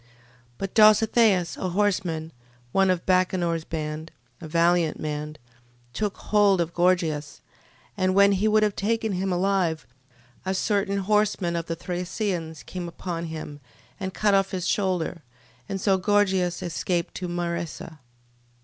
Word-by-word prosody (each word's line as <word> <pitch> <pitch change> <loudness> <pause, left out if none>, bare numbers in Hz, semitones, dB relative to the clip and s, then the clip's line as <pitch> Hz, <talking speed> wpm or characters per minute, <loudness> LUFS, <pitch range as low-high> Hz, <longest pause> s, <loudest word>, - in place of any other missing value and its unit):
12:35. 120 - -29 0.5
But 195 -1 -5
Dositheus, 215 -3 +4
a 185 - -2
horseman, 175 -5 0 0.4
one 195 +4 +3
of 180 -2 0
Bacenor's 180 -3 +1
band, 155 0 -5 0.3
a 160 - -7
valiant 170 0 +2
man, 150 0 -4 0.6
took 205 +4 -2
hold 205 -3 +3
of 170 0 -1
Gorgias: 170 -4 0 0.5
and 185 -2 +1
when 200 0 +6
he 200 +2 +1
would 215 0 +4
have 210 -2 +1
taken 220 +1 0
him 190 0 -1
alive, 180 -3 0 0.6
a 190 +1 -1
certain 200 0 0
horseman 200 -3 +1
of 170 -1 -3
the 165 - -2
Thracians 175 -2 -4
came 180 -2 -6
upon 170 0 -5
him, 155 -2 -7 0.4
and 190 -1 -3
cut 205 +1 +1
off 195 -1 +3
his 185 -1 -3
shoulder: 180 -4 -1 0.5
and 195 - -3
so 190 0 +2
Gorgias 190 -3 +1
escaped 175 0 -2
to 180 - -4
Maresa. 170 -2 -4
185 Hz, 140 wpm, -25 LUFS, 170-195 Hz, 0.6 s, when